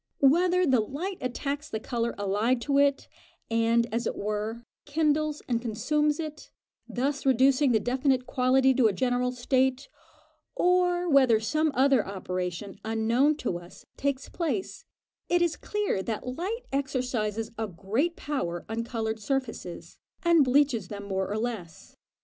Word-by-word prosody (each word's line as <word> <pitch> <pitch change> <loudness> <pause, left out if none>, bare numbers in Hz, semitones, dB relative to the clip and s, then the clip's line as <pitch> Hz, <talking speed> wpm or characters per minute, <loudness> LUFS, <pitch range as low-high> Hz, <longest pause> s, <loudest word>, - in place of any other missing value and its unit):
Whether 355 +6 +4
the 260 -6 +4
light 315 - -4
attacks 280 +4 -3
the 220 - -3
colour 235 +1 -2
allied 205 +5 +1
to 280 +2 +2
it, 280 -1 +2 0.4
and, 230 +1 +3
as 230 0 0
it - - -2
were, 215 +3 -3 0.2
kindles 305 0 0
and 235 -2 0
consumes 295 +7 0
it, 305 -2 -6 0.4
thus 275 +3 -1
reducing 265 +1 +4
the 220 - +4
definite 255 +3 +1
quality 260 +1 +3
to 250 -3 +4
a 210 - +1
general 250 +3 0
state, 260 +2 0 0.7
or 355 0 +2
whether 260 -7 +5
some 310 +8 +1
other 265 -3 +4
operation, 185 0 -5
unknown 230 +7 +2
to 180 - -2
us, 175 +1 -15
takes 280 -1 -2
place, 350 +2 -3 0.4
it 350 0 +3
is 335 -3 +1
clear 415 - -2
that 220 +4 -4
light 405 - -3
exercises 245 -5 -1
a 220 - -1
great 210 - -1
power 175 - -3
on 225 +1 -2
coloured 225 -2 -3
surfaces, 235 -7 -4 0.2
and 340 -3 +5
bleaches 255 -6 +2
them 200 0 -7
more 190 -1 -2
or 210 - -2
less. 215 -8 -5
255 Hz, 145 wpm, -27 LUFS, 220-290 Hz, 0.7 s, whether